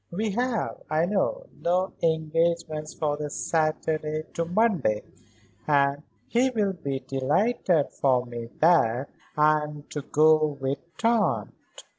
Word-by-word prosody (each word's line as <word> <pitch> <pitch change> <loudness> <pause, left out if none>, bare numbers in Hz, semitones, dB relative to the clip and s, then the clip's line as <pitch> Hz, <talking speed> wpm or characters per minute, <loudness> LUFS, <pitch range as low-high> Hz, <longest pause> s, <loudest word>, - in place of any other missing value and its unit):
"We 210 +4 -2
have, 240 +2 -2
I 155 +2 +2
know, 210 - -1 0.2
no 180 +2 +1
engagements 160 -1 0
for 150 -2 -1
this 150 0 -5
Saturday 155 -1 -1
to 170 - -1
Monday, 175 - +1 0.6
and 140 -1 +2 0.3
he 250 - +2
will 210 -6 0
be 140 -6 -4
delighted 150 - +1
for 130 -2 +1
me 120 -1 -7
that 140 -6 +3 0.3
I 155 0 +4
am 150 -1 -7
to 150 - -3
go 155 0 +3
with 135 +1 -2 0.2
Tante." 230 -2 +1
155 Hz, 125 wpm, -26 LUFS, 145-185 Hz, 0.6 s, I